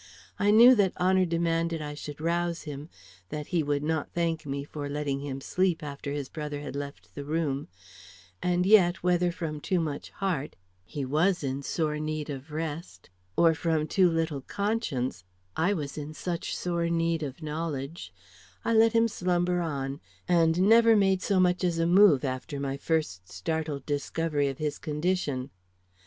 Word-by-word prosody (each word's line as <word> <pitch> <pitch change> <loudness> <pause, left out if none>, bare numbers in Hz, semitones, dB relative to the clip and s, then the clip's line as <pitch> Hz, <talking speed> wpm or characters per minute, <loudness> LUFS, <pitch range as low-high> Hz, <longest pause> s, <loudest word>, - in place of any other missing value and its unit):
I 205 - +3
knew 235 +4 +9
that 200 -6 +2
honor 185 +1 +3
demanded 165 -1 0
I 150 -1 -5
should 145 0 -8
rouse 170 +1 -1
him, 150 0 -7 0.4
that 150 -1 -4
he 170 - +3
would 145 -1 -1
not 160 -1 -1
thank 165 -3 -1
me 140 0 -3
for 145 0 -6
letting 145 -1 -2
him 140 -1 -5
sleep 180 +1 0
after 140 0 -5
his 145 -2 -3
brother 150 -1 -5
had 145 - -6
left 140 -12 -7
the 145 - -6
room; 150 -2 -1 0.7
and 180 0 +1
yet, 190 -4 +5
whether 180 0 +2
from 155 -4 -5
too 185 +2 0
much 150 -4 -3
heart 180 -8 -3 0.3
he 135 +9 -5
was 160 +6 +1
in 135 0 -2
such - - -5
sore 150 -2 0
need 155 -1 -3
of 135 +2 -7
rest 155 - -5 0.3
or 165 -1 +5
from 160 -1 0
too 185 +2 +3
little 160 -4 -1
conscience 170 - -2 0.3
I 180 +6 +2
was 150 -3 -4
in 150 +1 -7
such 170 0 -3
sore 170 -1 -1
need 165 -1 +1
of 145 +2 -6
knowledge 155 0 -4 0.5
I 230 - +2
let 225 +1 +5
him 230 0 +4
slumber 180 -3 0
on, 140 -3 -3 0.3
and 170 0 +3
never 230 +1 +7
made 195 -2 +3
so 195 -1 +1
much 180 0 +2
as 175 -2 +1
a 165 - +2
move 175 -6 +6
after 130 +3 -4
my 135 -1 -2
first 140 - -2
startled 150 - -3
discovery 145 0 -1
of 135 -1 -3
his 150 -1 -3
condition. 150 -4 -1
160 Hz, 175 wpm, -28 LUFS, 145-175 Hz, 0.7 s, knew